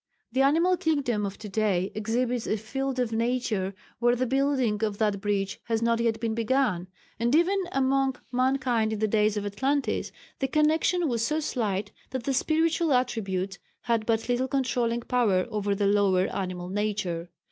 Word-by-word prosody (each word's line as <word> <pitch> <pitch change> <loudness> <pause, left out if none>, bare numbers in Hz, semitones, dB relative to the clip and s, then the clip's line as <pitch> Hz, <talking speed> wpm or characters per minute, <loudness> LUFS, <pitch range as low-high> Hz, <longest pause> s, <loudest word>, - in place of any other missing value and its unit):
The 260 +3 +1
animal 335 +7 +4
kingdom 265 -11 0
of 195 - -7
to 210 - -8
day 195 -2 0
exhibits 235 +3 -1
a 215 - +1
field 270 +5 -3
of 245 -3 0
nature 225 -5 -1 0.2
where 240 +1 +3
the 255 +1 0
building 260 -4 +1
of 210 -2 -1
that 210 -2 0
bridge 200 -1 -1
has 225 0 0
not 230 0 +2
yet 230 -1 +1
been 225 -1 -1
begun, 230 -5 +1 0.3
and 240 +4 +2
even 370 +4 +3
among 270 -1 +1 0.2
mankind 250 -3 +1
in - - -2
the 215 +1 +1
days 210 0 +2
of 205 - -2
Atlantis 265 +8 -1 0.3
the 270 - 0
connection 315 +4 +2
was 235 -4 0
so 305 +6 +1
slight 210 -9 -2 0.2
that 260 -2 -4
the 275 - 0
spiritual 320 +3 +1
attributes 195 -7 -1 0.2
had 230 -2 0
but 225 -1 +1
little 245 +1 +1
controlling 245 -3 0
power 225 -7 +2
over 205 -1 0
the 200 0 0
lower 195 -2 +3
animal 180 -2 -3
nature. 195 -4 -2
230 Hz, 170 wpm, -27 LUFS, 205-265 Hz, 0.3 s, animal